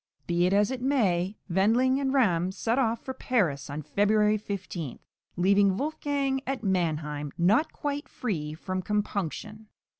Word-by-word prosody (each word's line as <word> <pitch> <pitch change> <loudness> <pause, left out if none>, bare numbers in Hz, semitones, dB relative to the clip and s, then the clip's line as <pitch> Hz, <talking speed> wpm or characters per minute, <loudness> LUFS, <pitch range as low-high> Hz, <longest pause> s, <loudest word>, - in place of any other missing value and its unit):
Be 175 +1 +2
it - - 0
as 205 +4 +3
it 260 -2 -4
may, 205 -8 +1
Wendling 230 +9 +3
and 270 -1 0
Ramm 185 -10 +2
set 230 +5 0
off 230 -3 0
for 260 - -3
Paris 180 - 0
on 150 +2 -5
February 210 +4 +3
15, 190 - -5 0.4
leaving 195 +1 +4
Wolfgang 280 -2 -1
at 270 -3 -2
Mannheim, 155 -6 -1
not 210 - +3
quite 290 0 -4
free 155 - -3
from 185 +3 -3
compunction. 210 +1 -3
205 Hz, 145 wpm, -28 LUFS, 175-255 Hz, 0.4 s, leaving